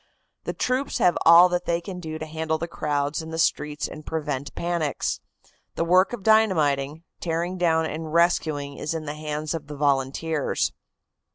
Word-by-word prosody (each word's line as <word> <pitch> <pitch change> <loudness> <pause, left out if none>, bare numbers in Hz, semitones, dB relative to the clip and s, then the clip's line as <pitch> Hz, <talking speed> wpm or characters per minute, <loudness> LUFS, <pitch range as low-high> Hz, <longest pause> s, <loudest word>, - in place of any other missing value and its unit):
The - - -2
troops 255 +2 -1
have 175 - +3
all 170 +2 +9
that 180 0 -1
they 170 0 +1
can 180 +1 -7
do 160 -2 -5
to 155 - -5
handle 160 0 -2
the 170 +2 -4
crowds 145 -2 -1
in 160 - -8
the 160 - -5
streets 150 -2 0
and 155 - -9
prevent 145 -3 -4
panics. 170 -4 -1 0.6
The 165 - 0
work 185 +3 +4
of 240 -5 -6
dynamiting, 160 -9 +2 0.2
tearing 175 +2 -2
down 160 -2 +2
and 160 0 -5
rescuing 155 -4 +1
is 155 +2 -3
in 160 -1 -4
the 145 - -4
hands 150 0 -4
of 155 -3 -5
the 150 - -7
volunteers. 140 +2 0
160 Hz, 175 wpm, -25 LUFS, 150-170 Hz, 0.6 s, all